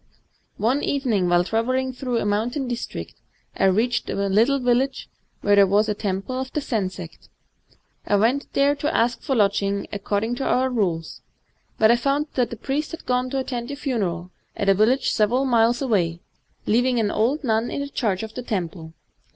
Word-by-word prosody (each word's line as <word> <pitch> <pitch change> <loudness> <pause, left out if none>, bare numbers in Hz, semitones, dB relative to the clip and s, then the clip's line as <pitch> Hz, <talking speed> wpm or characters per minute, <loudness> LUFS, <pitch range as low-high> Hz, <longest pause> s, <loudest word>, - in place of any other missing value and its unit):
One 250 +7 +1
evening, 230 -10 0
while 175 0 +4
travelling 255 +6 -1
through 250 -2 -2
a 225 - -1
mountain>district, 240 +4 -2 0.4
I - - +1
reached 220 +5 +1
a - - -2
little 210 +7 +2
village 255 +1 0 0.3
where 205 0 +4
there 200 -1 +6
was 205 +3 +3
a 210 - +1
temple 205 +5 -3
of 260 0 -4
the - - 0
Zen 220 -9 -1
sect. 180 -3 -11 0.8
I 205 - +3
went 235 +7 +1
there 280 +1 +3
to 300 +3 -1
ask 235 +1 +1
for 270 - -1
lodging, 200 -2 +1
according 205 +3 -1
to 270 - -3
our 260 0 +1
rules; 175 -9 -2 0.6
but 220 +1 +5
I 240 - +4
found 280 +4 0
that 250 -2 +1
the 235 - -7
priest 285 +6 -2
had 330 - -9
gone 250 0 0
to 270 - -2
attend 245 -2 -4
a 285 - -4
funeral 195 - -2 0.3
at 200 - 0
a - - +7
village 225 +7 +2
several 240 +5 +2
miles 240 0 +3
away, 175 -9 0 0.4
leaving 245 +3 +2
an 210 -2 +1
old 255 +8 0
nun 225 -1 +1
in 280 0 -3
charge 205 -7 -1
of 220 0 -7
the 250 - -5
temple. 170 -7 -4
230 Hz, 185 wpm, -23 LUFS, 200-260 Hz, 0.8 s, a